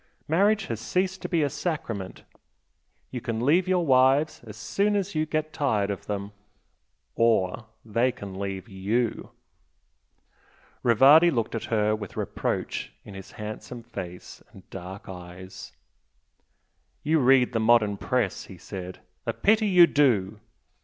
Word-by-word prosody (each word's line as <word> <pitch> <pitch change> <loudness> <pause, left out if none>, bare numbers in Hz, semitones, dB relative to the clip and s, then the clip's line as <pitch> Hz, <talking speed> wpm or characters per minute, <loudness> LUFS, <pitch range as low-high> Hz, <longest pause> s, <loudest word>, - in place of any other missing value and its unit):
Marriage 200 +6 +2
has 115 -2 -4
ceased 185 +11 -1
to - - -5
be 170 -4 +2
a 145 - +1
sacrament, 115 - -4 0.9
you 125 - -5
can 115 -1 -3
leave 175 +6 +3
your 180 -2 +2
wives 135 +3 +3
as 105 0 -9
soon 200 - 0
as 200 -1 -1
you 155 0 0
get 155 0 -2
tired 110 -9 0
of 100 - -7
them, 100 0 -4 0.8
or 115 -1 +1 0.2
they 115 +4 +1
can 100 -6 -9
leave 95 -1 -4
YOU!" 105 +4 -2 1.5
Rivardi 135 +9 +6
looked 120 -8 -1
at 115 - -3
her 110 -1 +1
with 105 -3 -8
reproach - - -3
in 100 - -10
his 95 -1 -11
handsome 110 +2 -7
face 95 -6 -9
and 95 - -16
dark 95 +4 -8
eyes. 90 0 -10 1.3
"You 160 +1 +2
read 130 -1 +4
the 115 - +1
modern 110 -2 +3
Press" 120 -2 -1
he 95 - -12
said 90 0 -8 0.3
"A 115 - 0
pity 215 - +2
you 180 -3 +7
do!" 110 - +1
115 Hz, 140 wpm, -26 LUFS, 100-155 Hz, 1.5 s, you